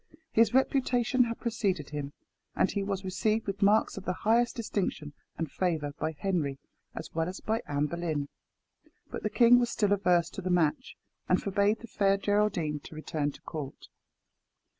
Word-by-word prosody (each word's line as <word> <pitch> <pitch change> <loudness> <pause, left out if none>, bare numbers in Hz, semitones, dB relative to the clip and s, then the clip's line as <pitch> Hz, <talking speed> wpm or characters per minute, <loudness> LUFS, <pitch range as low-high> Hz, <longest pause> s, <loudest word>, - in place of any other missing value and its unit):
His 230 +1 +4
reputation 255 -1 +2
had 230 -1 -4
preceded 195 - -1
him, 145 -1 -4 0.4
and - - +2
he 200 - -1
was 195 -1 -3
received 215 +4 0
with 200 +1 -4
marks 205 +1 +3
of 195 - -7
the 180 - 0
highest 235 +2 +3
distinction 190 -9 -3 0.2
and 160 -4 -3
favour 160 -6 -1
by 155 +1 -1
Henry, 160 -8 -1 0.4
as - - -7
well 165 +1 0
as 185 - -7
by 220 +1 -1
Anne 145 0 0
Boleyn. 155 -3 -2 0.8
But - - -5
the - - -1
king 245 0 +6
was 240 -1 +1
still 205 -3 +2
averse 175 -3 +2
to - - -6
the 185 - -3
match, 175 - +1 0.3
and - - +4
forbade 200 +2 +1
the 235 - -9
Fair 195 -2 +2
Geraldine 195 -7 0
to 155 - -12
return 155 -1 -2
to - - -15
court. 145 -4 -7
190 Hz, 175 wpm, -29 LUFS, 160-220 Hz, 0.8 s, king